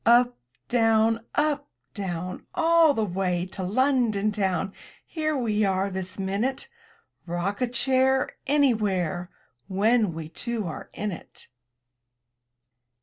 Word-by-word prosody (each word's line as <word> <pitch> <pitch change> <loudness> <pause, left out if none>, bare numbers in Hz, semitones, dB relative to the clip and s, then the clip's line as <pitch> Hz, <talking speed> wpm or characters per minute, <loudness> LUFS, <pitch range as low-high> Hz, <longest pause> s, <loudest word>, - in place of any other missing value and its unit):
Up, 245 +1 +5 0.3
down! 225 -1 +3
Up, 295 -1 +1 0.2
down! 185 -3 -5
All 330 -3 +5
the 220 - +1
way 180 -2 -1
to 195 - -6
London 220 0 +2
town 195 -1 -1 0.2
— - - -28
Here 310 -2 -1
we 215 -4 +1
are 195 0 +1
this 185 0 -4
minute! 205 - -1 0.6
Rock 175 +5 -2
a 250 - +2
chair 260 +2 +2 0.2
Anywhere, 205 - +1 0.4
When 210 -1 +2
we 160 -1 -5
two 225 +6 -3
are 165 - -6
in 210 0 -2
it. 170 - -10
215 Hz, 120 wpm, -26 LUFS, 190-255 Hz, 0.6 s, Up